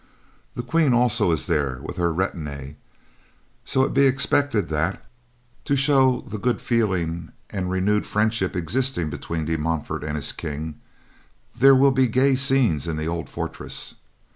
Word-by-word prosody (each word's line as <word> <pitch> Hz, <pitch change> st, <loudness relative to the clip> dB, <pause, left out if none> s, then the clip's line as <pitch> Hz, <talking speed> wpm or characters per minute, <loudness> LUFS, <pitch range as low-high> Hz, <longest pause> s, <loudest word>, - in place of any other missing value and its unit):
The 120 Hz, -, -4 dB
Queen 140 Hz, +2 st, +2 dB
also 120 Hz, -7 st, +3 dB
is 80 Hz, -5 st, 0 dB
there 70 Hz, -4 st, -1 dB
with -, -, -7 dB
her 85 Hz, -1 st, +1 dB
retinue, 75 Hz, -6 st, -4 dB, 0.9 s
so 130 Hz, -, +1 dB
it -, -, -1 dB
be 140 Hz, 0 st, +5 dB
expected 135 Hz, -5 st, +1 dB
that, 80 Hz, +4 st, -2 dB, 0.6 s
to 140 Hz, -, +1 dB
show 135 Hz, -2 st, +3 dB
the 105 Hz, +1 st, -7 dB
good 125 Hz, +4 st, 0 dB
feeling 90 Hz, -8 st, -1 dB, 0.2 s
and 90 Hz, -2 st, -3 dB
renewed 95 Hz, +3 st, 0 dB
friendship 105 Hz, -3 st, 0 dB
existing 90 Hz, -, -1 dB
between 80 Hz, -2 st, -4 dB
De 80 Hz, +1 st, -1 dB
Montfort 80 Hz, -1 st, -2 dB
and 75 Hz, 0 st, -3 dB
his 75 Hz, -, -2 dB
King, 75 Hz, 0 st, -6 dB, 0.7 s
there 135 Hz, +1 st, +6 dB
will 135 Hz, +1 st, +5 dB
be 130 Hz, -1 st, +3 dB
gay 130 Hz, +4 st, +3 dB
scenes 130 Hz, -, +2 dB
in 80 Hz, -2 st, -2 dB
the 80 Hz, -, -3 dB
old 85 Hz, 0 st, -3 dB
fortress. -, -, -5 dB
95 Hz, 155 wpm, -23 LUFS, 80-130 Hz, 0.9 s, there